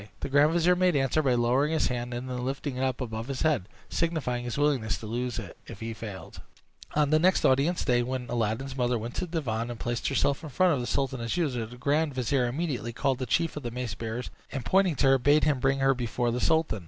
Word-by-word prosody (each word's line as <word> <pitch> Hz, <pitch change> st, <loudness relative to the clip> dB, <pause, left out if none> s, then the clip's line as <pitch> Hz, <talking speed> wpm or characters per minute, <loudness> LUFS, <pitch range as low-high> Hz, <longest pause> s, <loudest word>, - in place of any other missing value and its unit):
The -, -, -3 dB
grand 145 Hz, +3 st, +5 dB
vizier 175 Hz, +1 st, +4 dB
made 180 Hz, -2 st, +2 dB
answer 135 Hz, +2 st, +2 dB
by 130 Hz, -4 st, +2 dB
lowering 125 Hz, +6 st, +2 dB
his 160 Hz, -, +2 dB
hand, 120 Hz, -1 st, -3 dB
and 120 Hz, +2 st, -4 dB
then 125 Hz, -1 st, -4 dB
lifting 135 Hz, +1 st, -3 dB
it 130 Hz, -, -1 dB
up 130 Hz, 0 st, -1 dB
above 115 Hz, -1 st, -4 dB
his 135 Hz, -2 st, -3 dB
head, 140 Hz, -, +1 dB, 0.2 s
signifying 140 Hz, -8 st, -1 dB
his 120 Hz, -, -4 dB
willingness 140 Hz, -7 st, +1 dB
to -, -, -9 dB
lose 120 Hz, +3 st, -3 dB
it 105 Hz, -7 st, -7 dB
if 110 Hz, -, -9 dB
he 115 Hz, 0 st, -4 dB
failed. 105 Hz, -4 st, -8 dB, 0.5 s
On 150 Hz, -1 st, +2 dB
the 155 Hz, -, +5 dB
next 185 Hz, +3 st, +3 dB
audience 140 Hz, +7 st, +2 dB
day, 120 Hz, -1 st, +3 dB
when 125 Hz, 0 st, -3 dB
Aladdin's 120 Hz, +3 st, -2 dB
mother 125 Hz, -2 st, +1 dB
went 115 Hz, +2 st, -5 dB
to 180 Hz, -, -2 dB
the 165 Hz, 0 st, -3 dB
divan, 115 Hz, -2 st, -2 dB
and 120 Hz, -2 st, -6 dB
placed 120 Hz, -1 st, -2 dB
herself 140 Hz, 0 st, +1 dB
in 160 Hz, -, -7 dB
front 180 Hz, +4 st, +3 dB
of 140 Hz, -, 0 dB
the 120 Hz, -, -3 dB
sultan 130 Hz, -2 st, -1 dB
as 115 Hz, +7 st, -2 dB
usual, 125 Hz, -10 st, -1 dB
the 120 Hz, +2 st, -12 dB
grand 145 Hz, +2 st, +1 dB
vizier 125 Hz, 0 st, +1 dB
immediately 125 Hz, -4 st, -3 dB
called 130 Hz, +2 st, 0 dB
the 130 Hz, -, -3 dB
chief 165 Hz, +7 st, +1 dB
of 150 Hz, -, -4 dB
the 120 Hz, -, -4 dB
mace 120 Hz, -1 st, -4 dB
bearers, 115 Hz, +2 st, -5 dB, 0.2 s
and, 135 Hz, -5 st, -4 dB
pointing 185 Hz, +2 st, +3 dB
to 140 Hz, -, +1 dB
her, 135 Hz, 0 st, +5 dB
bade 145 Hz, +4 st, +4 dB
him 145 Hz, -3 st, +2 dB
bring 135 Hz, +1 st, +2 dB
her 135 Hz, 0 st, +3 dB
before 120 Hz, -1 st, -1 dB
the 125 Hz, +1 st, -2 dB
sultan. 160 Hz, -9 st, +2 dB
130 Hz, 250 wpm, -28 LUFS, 120-145 Hz, 0.5 s, grand